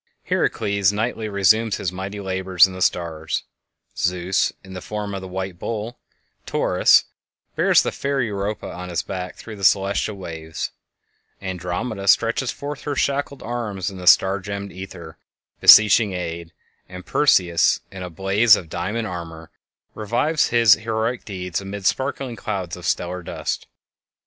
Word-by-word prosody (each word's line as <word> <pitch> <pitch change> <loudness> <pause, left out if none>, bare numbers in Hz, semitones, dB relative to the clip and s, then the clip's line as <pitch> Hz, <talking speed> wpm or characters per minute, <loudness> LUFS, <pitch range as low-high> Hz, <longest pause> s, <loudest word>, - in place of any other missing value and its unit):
Herakles 100 -1 +1
nightly 110 +1 -2
resumes 105 +2 +3
his 90 - -2
mighty 95 +2 -6
labors 95 -2 +3
in 95 - -6
the 95 - -8
stars; 80 -2 -1 0.5
Zeus, 90 +1 0
in 95 -1 -11
the 90 - -6
form 105 0 -5
of 95 - -4
the 95 - -7
white 95 -1 -5
"Bull," 115 +2 -5 0.5
Taurus, - - +4 0.5
bears - - +4
the - - -1
fair 140 0 -2
Europa 105 -3 -3
on 90 0 -7
his 85 -2 -2
back 90 -1 -6
through 110 -2 -10
the 100 - -10
celestial 100 +2 +2
waves; 80 -3 -6 0.7
Andromeda 95 +3 -4
stretches 115 +5 +3
forth 145 0 -5
her 145 -1 -3
shackled 140 +1 -1
arms 105 -6 -3
in 95 - -10
the 90 - -7
star 95 +2 +6
gemmed 100 +1 -6
ether, 90 -4 -10 0.4
beseeching 105 -1 +7
aid; 85 -2 -5 0.4
and 90 0 -9
Perseus, 90 - +3
in 95 -1 -8
a 90 - -5
blaze 100 +6 +4
of 85 -5 -7
diamond 105 +8 -3
armor, 80 -4 -7 0.4
revives 120 +9 0
his 115 -3 +6
heroic 110 +2 -2
deeds 90 -2 -4
amid 100 0 -7
sparkling 130 +1 -1
clouds 95 -7 -4
of - - -7
stellar 90 +1 -1
dust. - - -4
95 Hz, 150 wpm, -22 LUFS, 90-110 Hz, 0.7 s, beseeching